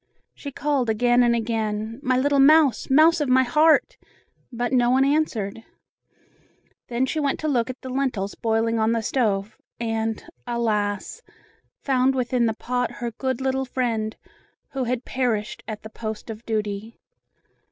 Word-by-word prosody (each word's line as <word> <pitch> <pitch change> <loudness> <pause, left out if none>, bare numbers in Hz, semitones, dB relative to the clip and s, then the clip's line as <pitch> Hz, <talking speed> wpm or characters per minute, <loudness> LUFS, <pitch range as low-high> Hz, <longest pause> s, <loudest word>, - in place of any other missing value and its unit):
She 285 - -8
called 280 -4 0
again 240 +3 +3
and 240 -1 +4
again, 220 0 -2
"My 255 -3 +1
little 280 +2 +2
mouse! 295 -1 +5
Mouse 315 +4 +5
of 290 - 0
my 260 +1 +5
heart!" 305 +5 +3 0.5
but 240 +1 -2
no 245 -1 +4
one 260 +2 +4
answered. 230 -8 -1 1.2
Then 245 +2 0
she 310 +4 -2
went 285 -2 0
to 310 - -1
look 250 -5 +1
at 255 - -6
the 260 - -7
lentils 250 -7 -1
boiling 225 0 0
on 220 +1 +2
the 230 -1 -1
stove, 215 -4 -1 0.2
and, 225 -1 -2 0.2
alas! 220 - -1 0.6
found 265 -1 +2
within 245 -1 +1
the 220 - -1
pot 245 +2 -2
her 240 -1 -4
good 260 +2 -3
little 265 0 0
friend, 230 -4 -2 0.5
who 265 -2 -3
had 250 +1 -2
perished 235 -5 -2
at 215 -2 -6
the 220 - -8
post 220 0 -6
of 220 +1 -9
duty. 215 0 -3
240 Hz, 155 wpm, -24 LUFS, 220-265 Hz, 1.2 s, mouse